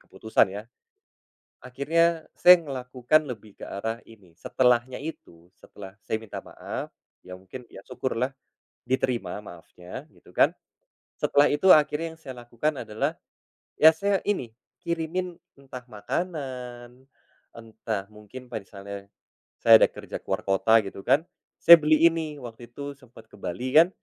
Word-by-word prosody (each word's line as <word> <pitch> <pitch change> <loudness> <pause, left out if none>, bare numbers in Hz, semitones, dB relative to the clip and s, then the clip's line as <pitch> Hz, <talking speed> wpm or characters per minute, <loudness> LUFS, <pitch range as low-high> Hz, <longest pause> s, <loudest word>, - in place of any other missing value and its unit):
keputusan, 110 -1 +1
ya. 105 - -6 1.0
Akhirnya 160 +6 0
saya 180 0 +8
ngelakukan 130 -1 0
lebih 110 -4 -9
ke - - -6
arah 110 +3 -3
ini, 100 -7 -18
setelahnya 125 +6 +1
itu, 85 - -10
setelah 95 -2 -13
saya 110 - -2
minta 110 -1 -8
maaf - - -7 0.3
ya, 90 0 -10
mungkin 115 +6 -12 0.2
syukurlah 130 +1 -3 0.5
diterima 125 -4 -1
maafnya, 90 -1 -11
gitu - - -20
kan. - - +3 0.7
Setelah 145 0 +4
itu 190 +6 +2
akhirnya 155 +1 +4
yang - - -29
saya 135 -5 -9
lakukan 120 +6 -2
adalah, 110 -1 -2 0.7
ya 160 - +10
saya 200 +4 +1
ini 190 - -1 0.3
kirimin 170 +2 -3 0.2
entah 130 -2 -11
makanan, 125 - -6 0.5
entah 110 -3 -5
mungkin 105 +4 -12
misalnya 100 -1 -8 0.6
saya 115 -1 +9
ada - - +6
kerja - - -8
ke - - -31
luar - - -2
kota, 110 +3 +3
gitu 100 -1 -8
kan, 135 +5 +4 0.4
saya 170 0 +11
beli 155 0 +3
ini 160 -2 -4
waktu 120 0 -10
itu 140 0 -7
sempet 120 -4 -17
ke - - -16
Bali 125 +9 -4
kan, 170 +2 +7
125 Hz, 135 wpm, -26 LUFS, 110-150 Hz, 1.0 s, saya